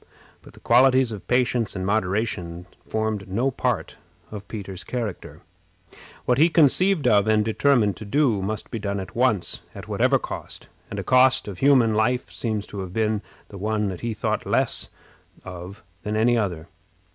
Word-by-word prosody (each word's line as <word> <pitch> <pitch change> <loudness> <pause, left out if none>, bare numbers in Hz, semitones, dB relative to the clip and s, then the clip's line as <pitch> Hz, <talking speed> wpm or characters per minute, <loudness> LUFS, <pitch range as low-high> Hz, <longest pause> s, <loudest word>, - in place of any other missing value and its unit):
But - - -16
the - - -16
qualities 130 +1 +4
of 105 -3 -8
patience 125 -3 +1
and 95 -1 -3
moderation 95 -4 -1 0.2
formed 110 -2 -2
no 120 +8 0
part - - -2 0.3
of 105 -2 -8
Peter's 95 -3 -6
character. 115 -7 -5 0.8
What 125 +1 +2
he 165 +3 +6
conceived 165 0 +3
of 105 -3 +4
and 110 -1 +3
determined 110 -3 +2
to 110 - -8
do 115 -2 +2
must 105 +3 -4
be 115 - -3
done 100 -1 -2
at 95 - -8
once, 115 -6 0
at - - -9
whatever - - +2
cost; - - -8 0.2
and - - -6
a - - -3
cost 130 -2 +4
of 95 -3 -7
human 130 -5 +4
life 120 +4 0
seems 110 -3 -3
to 100 - -5
have 95 -2 -6
been 110 -1 0 0.3
the 100 - -9
one 105 0 -1
that 90 - -7
he 115 -2 -3
thought - - -2
less - - 0 0.6
of 90 +1 -9 0.2
than 105 +1 -3
any 120 +2 +3
other. 90 -8 -2
110 Hz, 170 wpm, -24 LUFS, 100-125 Hz, 0.8 s, he